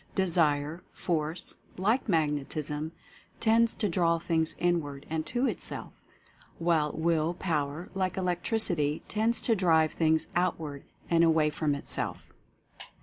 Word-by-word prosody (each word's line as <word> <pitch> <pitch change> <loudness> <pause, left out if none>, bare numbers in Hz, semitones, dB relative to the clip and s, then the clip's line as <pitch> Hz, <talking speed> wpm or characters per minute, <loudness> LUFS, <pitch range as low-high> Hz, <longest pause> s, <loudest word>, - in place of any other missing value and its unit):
Desire 165 -4 +1
Force, 165 +1 -2 0.2
like 220 +7 +1
Magnetism, 150 -1 -1 0.5
tends 230 +1 +3
to 210 - 0
draw 170 -2 +2
things 165 -1 0
inward 150 -5 -1
and 160 -1 -2
to 245 +2 0
itself; - - -4 0.6
while 165 -3 +2
Will 165 +1 +1
Power, 155 -2 -2
like 190 -1 -1
Electricity, 175 -4 +1
tends 225 +2 0
to 230 - +3
drive 160 -5 +3
things 160 -1 +2
outward 160 -5 -1 0.2
and 170 -1 +4
away 160 -2 +4
from 150 -1 0
itself. 140 - -4
165 Hz, 120 wpm, -29 LUFS, 155-185 Hz, 0.6 s, and